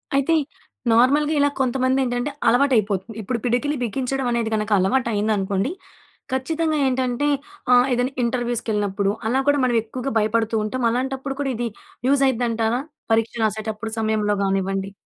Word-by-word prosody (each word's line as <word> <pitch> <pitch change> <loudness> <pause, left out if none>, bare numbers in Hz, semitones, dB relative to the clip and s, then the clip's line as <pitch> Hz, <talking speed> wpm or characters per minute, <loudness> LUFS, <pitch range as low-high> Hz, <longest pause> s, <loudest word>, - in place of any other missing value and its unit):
అయితే 275 +4 +2 0.6
నార్మల్‌గా 285 +6 +4
ఇలా 285 0 +4
కొంతమందేంటంటే 255 0 0 0.2
అలవాటైపోతుంది. 225 -5 +2
ఇప్పుడు 235 +4 -2
పిడికిలి 250 +5 +1
బిగించడం 260 +3 -2
అనేది 235 -2 0
కనుక 215 0 -2
అలవాటు 235 +7 +1
అయిందనుకోండి. 205 +2 0 0.6
ఖచ్చితంగా 315 +4 0
ఏంటంటే 255 +1 0 0.4
ఆహ్, 245 0 +6
ఏదైనా 245 +2 0
ఇంటర్‌వ్యూస్ 240 0 -1
కెళ్ళినప్పుడు 200 -1 0 0.2
అలా 255 +4 +2
కూడా 285 0 +4
మనం 245 -2 +1
ఎక్కువగా 255 +4 -5
భయపడుతూ 225 +1 0
ఉంటాం. 245 +4 -3
అలాంటప్పుడు 265 +2 -2
కూడా 270 -2 -1
ఇది 240 +1 -2 0.4
యూస్ 280 0 +3
అయిద్దంటారా, 230 -1 0 0.3
పరీక్ష 225 +1 +2
రాసేటప్పుడు 220 +1 -3
సమయంలో 215 -2 +1
కానివ్వండి? 195 0 -1
240 Hz, 130 wpm, -22 LUFS, 215-265 Hz, 0.6 s, ఆహ్